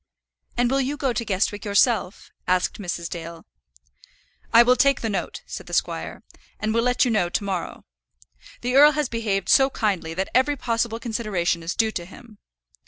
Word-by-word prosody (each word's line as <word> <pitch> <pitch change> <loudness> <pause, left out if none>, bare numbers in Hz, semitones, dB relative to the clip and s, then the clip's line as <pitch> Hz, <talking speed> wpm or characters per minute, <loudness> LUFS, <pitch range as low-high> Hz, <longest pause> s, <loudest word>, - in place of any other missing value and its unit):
"And 245 0 +2
will 270 0 +2
you 275 +3 -2
go 265 -4 0
to 235 - -2
Guestwick 205 0 -1
yourself?" 205 -1 +1 0.2
asked 185 +3 0
Mrs. 175 -2 -4
Dale. 165 -1 -8 1.1
"I 230 +1 +8
will 250 +1 +4
take 275 0 +3
the 225 - -2
note," 195 - -4
said - - -8
the - - -3
squire, - - -2 0.4
"and 215 0 -1
will 230 - +2
let 250 +2 +2
you 245 - 0
know 195 -6 +1
to 200 - -2
morrow. 190 -3 -4 0.8
The 250 +1 -1
earl 295 +2 +8
has 300 -3 -1
behaved 205 -5 -2
so 270 -1 +5
kindly 190 -10 -2
that 190 +2 -2
every 260 +4 +3
possible 230 -2 -1
consideration 215 -8 -1
is 165 +1 -4
due 225 -1 +1
to 175 -5 -5
him. 210 +3 -15
220 Hz, 180 wpm, -23 LUFS, 190-245 Hz, 1.1 s, I